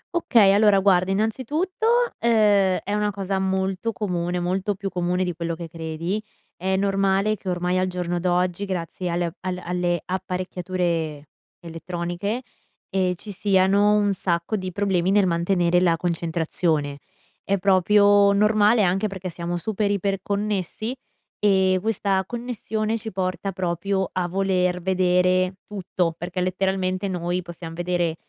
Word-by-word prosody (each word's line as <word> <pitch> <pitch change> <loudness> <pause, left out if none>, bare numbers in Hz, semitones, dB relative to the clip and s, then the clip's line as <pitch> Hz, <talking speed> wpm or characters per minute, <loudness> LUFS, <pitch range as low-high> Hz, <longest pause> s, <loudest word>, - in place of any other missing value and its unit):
Okay, 235 - +5
allora, 205 -1 +5
guarda, 190 -1 +3
innanzitutto, 265 - -1 0.3
ehm, 205 -5 +3
è 205 - -3
una 210 0 +1
cosa 195 -1 -2
molto 190 +3 -1
comune, 180 -3 -2
molto 190 +3 -1
più 195 0 -4
comune 180 0 0
di 180 -1 -2
quello 170 0 -3
che 170 0 -7
credi. 165 +5 -4 0.3
È 190 +2 -1
normale 195 +1 +1
che 190 -1 -7
ormai, 180 +1 0
al 185 - +1
giorno 175 -1 -2
d'oggi, 180 +2 0
grazie 180 -1 -4
alle 170 -1 -1
al 185 -1 -4
alle 175 -1 -1
apparecchiature 180 -5 -3 0.3
elettroniche, 175 +7 -4 0.5
ehm, 185 -1 +1
ci 205 +4 -10
siano 200 +1 +3
un 205 -1 +2
sacco 175 +2 -1
di 185 -2 -4
problemi 190 -1 0
nel 200 -1 +4
mantenere 175 0 +2
la 170 -2 +3
concentrazione. 160 -3 -1 0.4
È 200 0 0
proprio 200 +2 +4
normale, 210 +2 +4
anche 190 +3 +1
perché 190 -2 -6
siamo 175 +1 -4
super 210 +2 -1
iper-connessi 200 +3 -2 0.4
e 190 -2 +3
questa 200 -3 0
connessione 225 -2 -3
ci 220 0 -7
porta 185 +1 -2
proprio 190 +1 -2
a 180 -1 -1
voler 180 -1 0
vedere 185 0 +2
tutto, 180 -4 -2
perché 175 +2 -5
letteralmente 185 +1 -1
noi 180 0 -2
possiamo 170 -1 -9
vedere, 175 -1 -1
185 Hz, 135 wpm, -23 LUFS, 175-200 Hz, 0.5 s, Okay